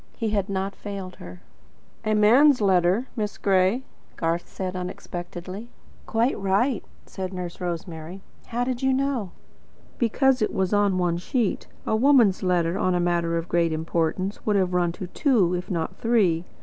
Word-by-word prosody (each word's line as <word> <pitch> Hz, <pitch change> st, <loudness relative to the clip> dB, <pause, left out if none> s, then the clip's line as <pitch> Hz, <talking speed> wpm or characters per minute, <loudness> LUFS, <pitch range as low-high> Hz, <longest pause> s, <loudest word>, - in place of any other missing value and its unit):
He 225 Hz, -2 st, -1 dB
had 200 Hz, -1 st, 0 dB
not 195 Hz, 0 st, -2 dB
failed 195 Hz, -3 st, -7 dB
her. 90 Hz, 0 st, -11 dB, 0.6 s
"A 215 Hz, 0 st, +1 dB
man's 250 Hz, +7 st, +6 dB
letter, 190 Hz, +2 st, +3 dB
Miss 210 Hz, -3 st, -3 dB
Gray," 195 Hz, +5 st, +2 dB, 0.3 s
said -, -, -31 dB
Garth 165 Hz, +1 st, -2 dB
unexpectedly. 185 Hz, +2 st, -5 dB, 0.4 s
"Quite 230 Hz, +3 st, +1 dB
right," 200 Hz, +5 st, +1 dB, 0.2 s
said 185 Hz, -1 st, -5 dB
Nurse 180 Hz, -1 st, -6 dB
Rosemary. 175 Hz, +1 st, -5 dB, 0.2 s
"How 240 Hz, +1 st, -1 dB
did 250 Hz, -1 st, -2 dB
you 265 Hz, 0 st, +2 dB
know?" 265 Hz, -7 st, 0 dB, 0.7 s
"Because 260 Hz, +2 st, +2 dB
it 215 Hz, -, +1 dB
was 190 Hz, +1 st, 0 dB
on 205 Hz, -2 st, +3 dB
one 175 Hz, -2 st, +1 dB
sheet. 215 Hz, +4 st, -1 dB, 0.2 s
A -, -, +1 dB
woman's 235 Hz, -5 st, +4 dB
letter 180 Hz, 0 st, +1 dB
on 185 Hz, -3 st, +2 dB
a -, -, +1 dB
matter 170 Hz, -1 st, +1 dB
of 165 Hz, +1 st, -3 dB
great 170 Hz, -2 st, +2 dB
importance 165 Hz, +4 st, -1 dB
would 210 Hz, -, +1 dB
have 185 Hz, -2 st, +1 dB
run 175 Hz, -1 st, +2 dB
to 185 Hz, -, -6 dB
two, 195 Hz, -, +2 dB
if 180 Hz, 0 st, -3 dB
not 165 Hz, -4 st, -2 dB
three. 195 Hz, -8 st, +2 dB
190 Hz, 160 wpm, -25 LUFS, 175-220 Hz, 0.7 s, man's